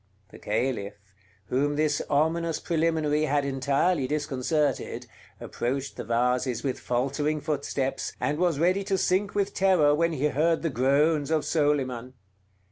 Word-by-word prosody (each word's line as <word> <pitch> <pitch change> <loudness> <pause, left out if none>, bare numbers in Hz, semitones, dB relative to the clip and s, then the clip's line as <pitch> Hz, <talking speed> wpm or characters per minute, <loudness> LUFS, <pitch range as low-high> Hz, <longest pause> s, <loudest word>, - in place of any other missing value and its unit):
The - - -14
Caliph, 105 -2 -2 0.5
whom 140 +7 0
this 150 -1 +1
ominous 160 +2 +1
preliminary 160 -2 +1
had 145 -1 +1
entirely 140 +3 +1
disconcerted, 150 +1 -1 0.3
approached 135 +3 -3
the - - -5
vases 125 +1 0
with 135 -3 -2
faltering 140 +5 -1
footsteps, 140 -2 -2
and 150 +2 -1
was 175 -4 +2
ready 185 +5 +2
to 195 -1 0
sink 190 +2 0
with 200 -1 0
terror 185 -7 +4
when 165 +2 +1
he 150 0 0
heard 160 +4 +1
the 165 - 0
groans 140 +4 +2
of 160 -2 +1
Soliman. 130 -5 0
145 Hz, 135 wpm, -26 LUFS, 135-160 Hz, 0.5 s, terror